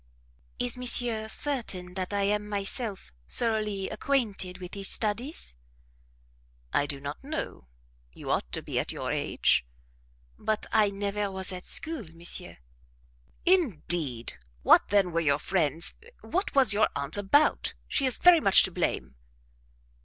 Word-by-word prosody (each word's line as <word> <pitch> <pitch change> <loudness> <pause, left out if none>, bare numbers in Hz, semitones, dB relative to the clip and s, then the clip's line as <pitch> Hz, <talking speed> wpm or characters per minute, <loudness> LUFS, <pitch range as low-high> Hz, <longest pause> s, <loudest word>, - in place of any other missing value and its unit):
"Is 245 0 0
monsieur 240 -3 +1
certain 220 -9 -1
that 185 0 -4
I 200 -1 0
am 210 +1 0
myself 200 - -3 0.2
thoroughly 215 -4 0
acquainted 215 -7 -1
with 180 -1 -9
these 195 -1 -1
studies?" 235 - -2 1.2
"I 145 - +2
don't 140 -1 -5 0.2
know; 275 - -5 0.4
you - - -6
ought - - -1
to - - -1
be - - -2
at - - -1
your - - -4
age." - - +2 0.8
"But 215 -1 -1
I 215 -2 +4
never 200 +1 -2
was 190 0 -3
at 180 0 -7
school, 315 - -1
monsieur 170 +1 -5 0.5
" - - -34 0.2
"Indeed! 155 - -2 0.3
What - - +6
then 200 -3 +2
were 165 - +1
your 145 -4 +2
friends 165 -1 0 0.3
what 370 -1 -2
was 265 -6 +5
your 215 +1 +3
aunt 140 +3 +1
about? 205 +10 +2
She 275 - +1
is 255 - +1
very 355 -2 +7
much 195 -10 +6
to 190 - 0
blame." 170 - -2
200 Hz, 140 wpm, -28 LUFS, 175-230 Hz, 1.2 s, very